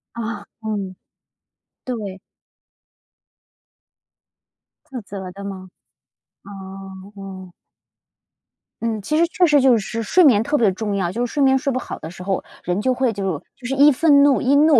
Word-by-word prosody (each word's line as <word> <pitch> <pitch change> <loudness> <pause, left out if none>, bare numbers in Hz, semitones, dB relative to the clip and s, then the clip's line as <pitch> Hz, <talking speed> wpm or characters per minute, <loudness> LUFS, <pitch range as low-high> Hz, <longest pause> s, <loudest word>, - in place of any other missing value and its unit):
啊， 220 -3 -5 0.2
嗯， 205 -4 -4 0.9
对。 210 -7 -5 2.7
自 255 - -4
责 190 -2 -7
的 200 +2 -10
吗？ 190 -2 -7 0.8
哦， 195 0 -10
哦。 190 -2 -9 1.3
嗯， 225 -2 -2
其 305 +10 -1
实 340 +1 +4
确 355 +1 +2
实 295 -3 +5
就 255 -3 +5
是 225 +2 -3
睡 365 - +4
眠 230 -8 +6
特 295 +5 0
别 215 -5 +3
重 205 +1 -3
要， 180 -3 -1
就 240 +5 -1
是 240 - -7
睡 285 - +2
眠 265 0 +5
睡 275 0 -1
不 - - -1
好 - - -7
的 160 - -7
时 180 +1 -10
候， 195 0 -1 0.2
人 180 +2 -1
就 255 +3 +1
会 255 -1 +1
就 195 -3 -2 0.2
就 245 - -8
是 270 - -1
易 285 +2 +7
愤 285 0 +5
怒- 285 -2 +4
易 270 +2 +3
怒， 300 0 +6
220 Hz, 175 characters per minute, -21 LUFS, 195-265 Hz, 2.7 s, 易